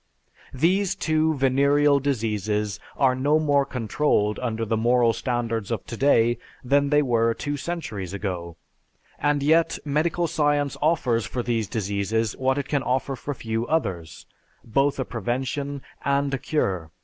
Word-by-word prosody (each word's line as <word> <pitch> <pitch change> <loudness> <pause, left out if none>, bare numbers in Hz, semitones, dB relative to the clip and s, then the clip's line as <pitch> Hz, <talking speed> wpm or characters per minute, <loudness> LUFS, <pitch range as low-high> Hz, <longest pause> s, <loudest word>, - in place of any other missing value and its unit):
These 185 +7 +2
two 155 0 +1
venereal 140 +2 +3
diseases 105 -6 -1 0.2
are 135 -2 +4
no 140 +4 +2
more 145 -3 +2
controlled 115 -3 0
under 115 -2 -2
the 110 +1 0
moral 120 +1 +3
standards 115 -3 -2
of 115 -4 -3
today 120 -1 +2 0.2
than 140 +2 +2
they 150 0 +4
were 115 -3 +2
two 145 0 -3
centuries 135 - -5
ago, 90 -4 -4 0.6
and 145 -1 +1
yet 160 +3 +3
medical 160 +4 0
science 145 -3 +1
offers 140 -7 +1
for 125 - -3
these 115 -3 -1
diseases 105 +2 -1
what 130 +1 +1
it 140 -1 -2
can 145 -2 0
offer 130 +2 -1
for 140 +3 -5
few 115 0 -3
others; 95 - -2 0.4
both 135 +5 +1
a 130 - -1
prevention 130 +5 -3 0.2
and 140 0 +1
a 135 - -1
cure. 95 - -1
130 Hz, 145 wpm, -24 LUFS, 115-145 Hz, 0.6 s, are